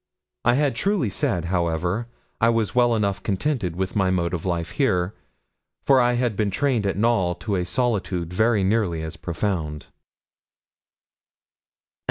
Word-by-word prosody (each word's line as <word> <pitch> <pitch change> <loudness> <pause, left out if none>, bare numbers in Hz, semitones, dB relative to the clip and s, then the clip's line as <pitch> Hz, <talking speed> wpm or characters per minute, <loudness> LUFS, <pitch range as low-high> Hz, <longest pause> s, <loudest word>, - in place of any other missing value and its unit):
I 120 +1 +4
had 145 -2 +1
truly 190 - 0
said, 90 -2 -1
however, 90 +6 0 0.3
I 115 - +4
was 115 -4 +1
well 120 -1 +4
enough 100 -3 0
contented 105 - -1
with 95 +1 -3
my 95 -2 +2
mode 90 -2 0
of 85 +1 -3
life 85 -2 -2
here, 90 -7 +1 0.7
for 135 -2 +5
I 120 0 +3
had 120 -3 0
been 105 0 0
trained 120 -1 0
at 95 - -1
Knowl 105 -5 +2
to 105 0 -3
a 90 -1 0
solitude 95 -7 -1
very 110 +1 +2
nearly 95 -5 +1
as 80 +2 -6
profound. 85 -4 -3
100 Hz, 150 wpm, -23 LUFS, 90-120 Hz, 0.7 s, for